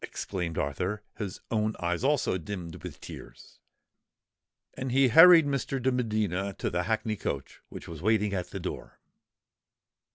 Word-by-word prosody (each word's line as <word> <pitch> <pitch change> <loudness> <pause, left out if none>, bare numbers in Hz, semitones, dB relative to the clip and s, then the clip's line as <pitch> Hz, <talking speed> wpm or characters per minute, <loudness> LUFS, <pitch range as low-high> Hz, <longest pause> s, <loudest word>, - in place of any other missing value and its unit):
exclaimed 90 -4 -4
Arthur, 90 +9 -2 0.2
his 100 -4 -5
own 110 -1 0
eyes 85 +4 -1
also 140 -7 +2
dimmed 85 -2 -7
with - - -8
tears. - - -12 1.1
And 130 -1 -4
he 135 0 +4
hurried 165 +3 +9
Mr. 140 -1 -1
de 130 +1 +1
Medina 105 -6 -1
to - - -3
the 90 0 -1
hackney 110 +1 -1
coach, 70 -8 -5
which - - -9
was 80 -2 -8
waiting 105 0 +2
at 90 -2 -3
the - - -6
door. - - -7
105 Hz, 150 wpm, -28 LUFS, 90-125 Hz, 1.1 s, hurried